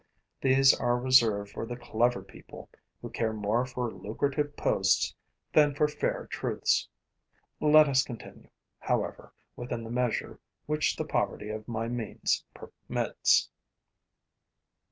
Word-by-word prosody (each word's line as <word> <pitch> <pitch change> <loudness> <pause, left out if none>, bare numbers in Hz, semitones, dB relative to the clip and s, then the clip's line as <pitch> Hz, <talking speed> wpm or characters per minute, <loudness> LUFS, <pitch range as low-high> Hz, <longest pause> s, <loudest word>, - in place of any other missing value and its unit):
These 135 0 +5
are 120 0 0
reserved 115 -5 +3
for - - -5
the 120 0 -5
clever 120 0 0
people - - -13 0.3
who - - -5
care 110 -1 -1
more 110 +4 0
for 125 -2 -3
lucrative 140 +10 -2
posts 95 0 +2 0.4
than 150 -2 +4
for 150 +1 +3
fair 150 0 -2
truths. - - -1 0.7
Let 155 0 +6
us 130 -2 +4
continue, 120 -3 -11 0.3
however, - - -2 0.2
within 120 -1 -5
the 115 - -7
measure 125 -1 -2 0.3
which 150 +1 0
the - - -3
poverty 105 - -2
of 110 0 -6
my 115 -1 -3
means 120 -3 -2
permits. - - 0
120 Hz, 125 wpm, -29 LUFS, 110-135 Hz, 0.7 s, Let